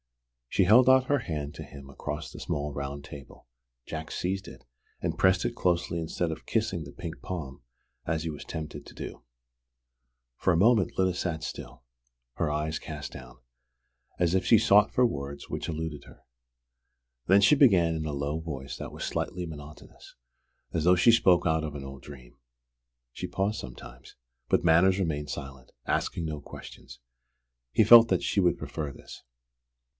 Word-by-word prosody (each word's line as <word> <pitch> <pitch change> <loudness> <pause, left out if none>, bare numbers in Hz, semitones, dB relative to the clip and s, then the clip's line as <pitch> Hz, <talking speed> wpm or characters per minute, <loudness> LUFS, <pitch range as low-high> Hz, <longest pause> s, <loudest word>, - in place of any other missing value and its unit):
She - - +3
held 120 +7 +6
out 130 0 +6
her 145 +1 +2
hand 75 - -4
to 80 - -7
him 70 -2 -12
across 70 - -5
the - - -10
small 75 0 -3
round 70 0 -5
table. 70 -3 -12 0.4
Jack 80 0 -6
seized 95 +1 -3
it, - - -14 0.3
and - - -3
pressed 95 -1 +3
it 120 - -2
closely 85 -3 0
instead 80 +1 -2
of 80 - -8
kissing 110 -7 -1
the 70 - -10
pink 85 0 -8
palm 80 -8 -6 0.4
as 80 -1 -1
he 85 - -3
was 75 - -8
tempted 80 -1 -7
to - - -13
do. - - -8 1.1
For 95 - +2
a 85 - +2
moment 105 +1 +3
Lyda 95 -1 +2
sat 80 -3 -3
still, - - -7 0.5
her 75 - -1
eyes 75 +1 -2
cast 75 -2 -7
down, 60 -1 -11 0.8
as 85 -1 +2
if 95 - +2
she 115 - +6
sought 105 0 +5
for 125 - +3
words 70 - -4
which - - -4
eluded 80 -2 -4
her. - - -17 1.0
Then 95 +2 +6
she 115 +9 +6
began 95 - +5
in 80 -1 -3
a 75 - -2
low 70 +2 -2
voice 70 -5 -6
that - - -7
was - - -5
slightly 90 -1 -3
monotonous, 75 -2 -12 0.6
as 80 - 0
though 90 +2 +6
she 115 +7 +6
spoke 95 -6 +4
out 80 -1 +2
of 75 -2 -5
an 70 -1 -6
old 70 -1 -9
dream. 65 -4 -13 0.8
She - - -5
paused 100 +3 -1
sometimes; 60 -1 -11 0.3
but - - +2
Manners 90 +4 +5
remained 75 -5 -2
silent, 70 -3 -8
asking 85 - -1
no 75 -2 -4
questions. - - -11 0.7
He 110 - +4
felt 115 +1 +9
that 95 - +1
she 100 - +1
would 90 -4 +2
prefer 75 -3 -5
this. - - -12
80 Hz, 175 wpm, -28 LUFS, 70-95 Hz, 1.1 s, felt